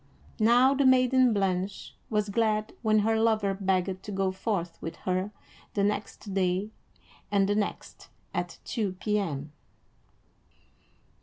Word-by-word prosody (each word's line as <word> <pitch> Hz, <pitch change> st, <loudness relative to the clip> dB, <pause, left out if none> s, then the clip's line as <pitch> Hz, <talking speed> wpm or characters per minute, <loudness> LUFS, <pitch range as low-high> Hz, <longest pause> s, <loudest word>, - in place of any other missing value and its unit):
Now 245 Hz, +5 st, +5 dB
the 280 Hz, 0 st, +2 dB
maiden 255 Hz, -1 st, +5 dB
Blanche 195 Hz, -1 st, -1 dB, 0.2 s
was 210 Hz, -2 st, 0 dB
glad 215 Hz, 0 st, 0 dB
when 215 Hz, -2 st, +3 dB
her 225 Hz, 0 st, +2 dB
lover 220 Hz, -3 st, +2 dB
begged 190 Hz, -1 st, -1 dB
to 210 Hz, -, -7 dB
go 195 Hz, -1 st, 0 dB
forth 190 Hz, -3 st, -3 dB
with 165 Hz, -, -5 dB
her 185 Hz, +2 st, 0 dB, 0.5 s
the 200 Hz, -, +2 dB
next 205 Hz, 0 st, -2 dB
day 190 Hz, +2 st, 0 dB, 0.6 s
and 200 Hz, -1 st, +3 dB
the 205 Hz, -, +2 dB
next, 205 Hz, -1 st, -4 dB, 0.2 s
at -, -, -3 dB
two 210 Hz, -6 st, -2 dB
P.M. 185 Hz, -8 st, -2 dB
205 Hz, 130 wpm, -28 LUFS, 190-220 Hz, 0.6 s, Now